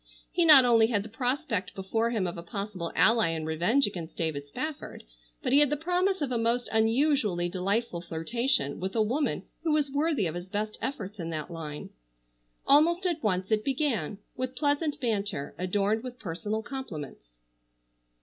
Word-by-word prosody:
He 345 - +2
not 290 -5 +9
only 230 -2 +5
had 210 -4 0
the 220 - -9
prospect 245 - -2
before 225 +4 0
him 220 -5 0
of 175 - -3
a 170 - -6
possible 185 -1 -5
ally 225 -2 +4
in 160 -1 -2
revenge 175 - +2
against 175 -5 -6
David 150 -4 -2
Spafford, 305 - -6 0.4
but - - 0
he 280 - +7
had 295 -2 +5
the 295 - 0
promise 360 +2 +1
of 270 - -2
a 240 - 0
most 235 +2 +1
unusually 225 - +2
delightful 190 +1 -1
flirtation 175 - 0
with 190 +4 -4
a 225 - +3
woman 265 +8 -1 0.2
who 330 - 0
was 295 -2 +1
worthy 290 - +1
of 160 - -2
his 175 +2 -6
best 215 +2 -3
efforts 210 -6 -4
in 165 -1 -4
that 155 +1 -5
line. 155 -3 -7 0.7
Almost 340 +6 +4
at 340 -3 0
once 190 -1 -1
it 215 -1 +2
began, 255 - -1 0.2
with 255 0 -4
pleasant 290 +2 0
banter, 205 - -2
adorned 200 +4 +1
with 250 -1 -7
personal 210 +2 -3
compliments. 150 - -8
220 Hz, 175 wpm, -28 LUFS, 180-275 Hz, 0.7 s, not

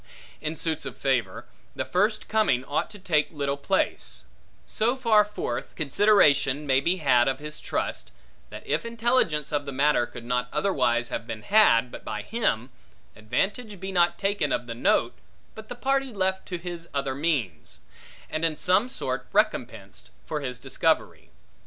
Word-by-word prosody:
In 155 +1 -3
suits 160 -1 -3
of - - -8
favor, 120 -9 -1 0.3
the - - -2
first 210 +4 0
coming 210 - +2
ought 145 - -1
to 205 - -11
take 160 -6 +1
little 140 -3 -2
place: 60 - -2 0.4
so 230 +4 0
far 230 -5 +4
forth, 205 -12 -5
consideration 150 -4 +3
may 135 -1 +3
be 170 +6 +1
had 125 -7 +3
of 135 0 0
his 150 +2 -7
trust, - - -3 0.4
that - - -10
if 150 +3 0
intelligence 230 - +1
of 145 -1 -1
the - - -3
matter 140 -2 +2
could 120 - -10
not 125 0 -1
otherwise 125 -8 +1
have 115 - -4
been 110 -3 -6
had, 125 - +4
but - - -9
by 105 -1 -5
him, 135 - -1 0.4
advantage 190 - -2
be 190 +1 -5
not 175 -2 +2
taken 195 -7 0
of 120 - -1
the 120 - -5
note, 115 - +2 0.4
but 220 0 -11
the - - -5
party 270 +1 0
left 190 -2 -1
to 180 - -3
his 170 -1 -7
other 140 -1 -1
means; 130 - -2 0.5
and 155 - -4
in 160 -2 +1
some 195 +7 +2
sort - - -3
recompensed, - - -1 0.2
for 150 -1 -3
his 125 -3 -4
discovery. - - -1
150 Hz, 165 wpm, -26 LUFS, 130-200 Hz, 0.5 s, far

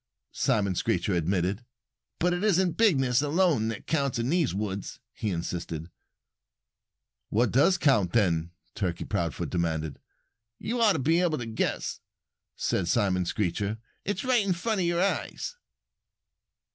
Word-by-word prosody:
Simon 100 -3 +1
Screecher 95 0 0
admitted. 90 +5 0 0.5
"But 175 +1 +2
it 175 +2 -2
isn't 190 -4 +3
bigness 140 - +3
alone 150 -6 +2
that 115 -2 -5
counts 140 -5 0
in 115 +2 -1
the 170 +1 +3
woods," 100 0 -4
he 110 - -3
insisted. 85 -2 -4 1.4
"What 120 +3 +2
does 145 +9 +4
count, 125 - +3
then?" 85 -7 +2 0.2
Turkey 90 -4 -2
Proudfoot 85 -8 -2
demanded. 80 -4 -1 0.6
"You 235 - -2
ought 215 -3 +6
to - - -1
be 160 +5 +2
able 165 -4 +1
to 120 - -4
guess," 110 0 -2 0.6
said 90 - -1
Simon 95 -4 +2
Screecher. 100 +3 -1 0.3
"It's 205 0 -2
right 250 -4 +3
in 195 -2 +1
front 200 +3 -1
of 175 - +1
your 175 +1 +2
eyes." 200 - -2
115 Hz, 140 wpm, -28 LUFS, -, 1.4 s, ought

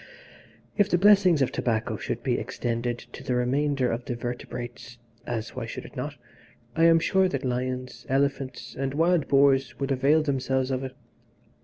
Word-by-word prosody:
"If 205 -1 +3
the 175 - +3
blessings 190 -6 +5
of 125 - -1
tobacco 110 -2 -1
should - - -4
be - - +1
extended 120 0 -2
to - - -12
the 125 - -1
remainder 135 +1 +1
of 115 +2 -3
the 120 - -3
vertebrates 120 0 -6 0.3
(as, 115 -2 -3
why - - -4
should - - -7
it - - -13
not?) - - -4 0.6
I 165 0 +4
am 165 0 +7
sure 190 +3 +2
that 140 -3 -3
lions, 125 0 -3
elephants, 135 -1 -1
and 135 0 -3
wild 165 0 +2
boars 135 -1 +3
would 140 0 -2
avail 140 +4 +3
themselves 130 -2 0
of 130 0 -1
it. 130 -1 -6
135 Hz, 170 wpm, -26 LUFS, 125-150 Hz, 0.6 s, am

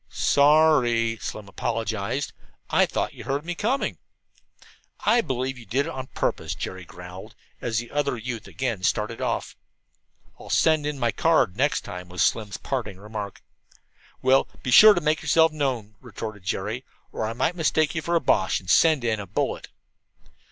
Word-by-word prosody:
"Sorry," 140 -6 +3
Slim 105 -2 -6
apologized. 115 +4 -2 0.4
"Thought - - +1
you - - -10
heard 140 +3 -2
me 175 - -2
coming." 235 +10 -1 1.0
"I 240 - +4
believe 130 - -3
you 115 - -12
did 135 +7 +1
it - - -4
on 130 0 -6
purpose," - - -2
Jerry 95 -1 -6
growled, 90 +2 -11 0.3
as 115 -2 -1
the 120 +1 -3
other 145 -3 0
youth 115 0 -6
again 120 -7 -3
started - - -1
off. - - -2 0.8
"I'll - - -11
send 155 -2 +3
in 150 -1 -3
my 120 -3 +1
card 160 -6 +3
first 90 - -20
next 145 +2 +2
time," 90 0 -8
was 90 -1 0
Slim's 105 -4 0
parting 115 -8 -4
remark. 105 -1 -7 0.8
"Well, 130 +1 +4 0.2
be 125 - -2
sure 215 - +9
to 175 - 0
make 155 0 +1
yourself 160 -1 +4
known," 130 -8 -2
retorted 110 -3 -7
Jerry, 105 +6 -3 0.3
"or - - -4
I 115 - -3
might 130 +9 0
mistake 155 -2 +1
you 160 - -2
for 170 +2 -1
a - - +5
Boche 95 -9 +2
and 90 -2 -3
send 155 -6 +5
in 110 -3 0
a 100 - -6
bullet." 95 - -2
125 Hz, 170 wpm, -25 LUFS, 105-150 Hz, 1.0 s, sure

